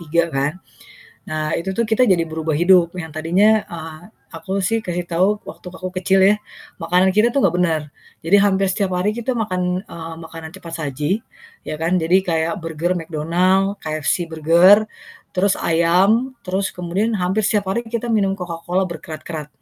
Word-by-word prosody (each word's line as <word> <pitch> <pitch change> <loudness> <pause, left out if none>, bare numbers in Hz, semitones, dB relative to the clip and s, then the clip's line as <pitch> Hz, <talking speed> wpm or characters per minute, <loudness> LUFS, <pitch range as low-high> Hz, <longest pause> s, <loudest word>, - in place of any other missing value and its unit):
3 170 +1 +1
kan. 140 +2 0 0.8
Nah, 155 0 -2
itu 190 +3 -3
tuh 235 - +2
kita 225 +3 +3
jadi 170 -3 +3
berubah 160 0 -3
hidup 175 0 +4
yang 160 -3 -6
tadinya, 195 +7 +3
eee, 160 -2 -8 0.3
aku 195 0 -3
sih 225 +2 +1
kasih 175 0 -3
tahu, 185 +5 +1
waktu - - -11
aku 185 0 -6
kecil 190 +1 +2
ya. 205 +2 +6 0.5
Makanan 180 +3 +3
kita 215 +4 +4
tuh 275 - +2
nggak 175 -2 +3
bener. 165 -4 +1 0.4
Jadi, 190 +5 +5
hampir 195 -1 +2
setiap 190 -1 -1
hari 185 +4 +1
kita 240 +2 -2
makan, 185 -5 -1
eee, 165 -3 -8
makanan 160 0 -9
cepat 170 -3 -10
saji, 150 - -2 0.4
ya - - -4
kan, 170 +3 +1
jadi 170 +1 +3
kayak 165 0 +1
burger 165 +2 -2
McDonald's, 180 +5 0
KFC 155 +2 -1
burger, 170 +7 +5 0.5
terus 195 +1 +2
ayam 190 +10 +2
terus 190 +1 -1
kemudian 190 +6 -1
hampir 190 +3 0
setiap 200 -3 0
hari 235 - 0
kita 235 0 -3
minum 195 -3 +2
Coca-Cola 180 +1 -2
berkerat-kerat. 155 -2 -7
180 Hz, 165 wpm, -20 LUFS, 165-195 Hz, 0.8 s, ya